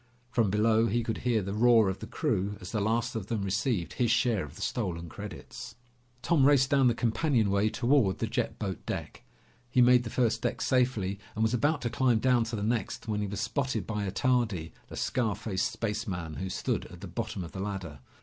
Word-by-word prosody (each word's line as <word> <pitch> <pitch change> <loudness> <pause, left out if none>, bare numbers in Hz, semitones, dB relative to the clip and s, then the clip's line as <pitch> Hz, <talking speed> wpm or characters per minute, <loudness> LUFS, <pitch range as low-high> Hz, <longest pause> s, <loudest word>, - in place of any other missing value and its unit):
From 115 -5 +2
below, 110 +3 +3
he 115 +3 0
could 110 -1 -3
hear 115 -4 +1
the 100 +1 -4
roar 115 -1 +5
of 95 0 -2
the - - -7
crew 100 +2 -1
as 90 - -8
the 110 - -1
last 115 +3 0
of 105 -3 -4
them 110 -4 -2
received 100 - -1
his 120 -2 +1
share 115 -3 +2
of 75 0 -10
the - - -10
stolen 90 -8 -2
credits. - - -8 0.5
Tom 165 -5 +3
raced 140 -1 +4
down 135 -2 +5
the 120 - +3
companionway 110 -4 +2
toward 120 -5 +2
the - - -1
jet - - -2
boat - - -4
deck. - - -5 0.5
He 125 - +1
made 125 0 +6
the 115 - -5
first 120 -1 +1
deck - - -1
safely 115 -7 +1 0.2
and 110 - 0
was 110 +2 +2
about 145 +4 +1
to 120 - -1
climb 130 -4 +3
down 120 0 +3
to 115 0 -4
the 100 - -3
next 115 -1 -2
when 105 -1 -1
he 105 - -1
was 100 0 -4
spotted 130 -6 -1
by 105 -2 -2
Attardi, 110 -8 0 0.2
the - - -9
scar 115 -5 0
faced 105 -3 -2
spaceman, 100 -7 -3
who 95 0 -3
stood - - -2
at 90 0 -13
the 100 - -6
bottom 105 +1 -4
of 85 - -8
the 95 - -7
ladder. 95 -7 -5
110 Hz, 215 wpm, -29 LUFS, 100-120 Hz, 0.5 s, made